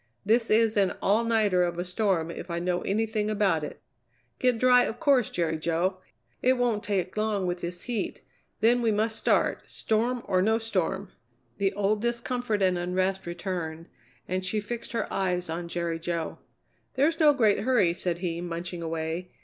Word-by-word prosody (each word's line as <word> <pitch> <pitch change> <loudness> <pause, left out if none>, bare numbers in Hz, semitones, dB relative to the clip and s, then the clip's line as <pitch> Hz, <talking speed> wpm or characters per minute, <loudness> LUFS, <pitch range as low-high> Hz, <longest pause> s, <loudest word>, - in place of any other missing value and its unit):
This 225 +2 +3
is 220 0 +3
an 195 -2 +3
all 210 +4 +2
nighter 215 -5 +2
of 175 -1 0
a 175 - -2
storm, 180 -3 0
if 170 - -8
I 170 - -2
know 175 +1 -1
anything 215 +1 0
about 195 -7 +1
it." 150 - -7 0.6
"Get 250 -2 +2
dry, 250 +1 +6
of 225 - -5
course, 275 -7 +3
Jerry 160 -2 -1
Jo. 170 +4 0 0.4
It 255 +1 +3
won't 240 -4 +1
take 190 -3 -1
long 215 -3 0
with 175 0 -2
this 175 +1 -5
heat; 240 -3 -3 0.4
then 240 +3 +4
we 230 -2 +2
must 215 +1 0
start, - - +1
storm 235 +3 0
or 185 -2 +2
no 220 +3 +3
storm." 200 -3 -2 0.5
The 195 -1 +2
old 205 +1 0
discomfort 235 -2 -1
and 180 -1 +2
unrest 185 +1 -1
returned, 170 -2 -4 0.4
and 185 +1 -2
she 190 +3 0
fixed 230 +3 -6
her 230 - 0
eyes 180 -3 -1
on 170 +1 -4
Jerry 170 -1 -2
Jo. 165 -1 -3 0.6
"There's 305 +5 +2
no 305 -2 +7
great 225 -8 +3
hurry," 210 -7 +3
said 175 -1 -2
he, 170 -1 -3
munching 175 0 -5
away. 165 +2 -3
195 Hz, 175 wpm, -27 LUFS, 175-225 Hz, 0.6 s, no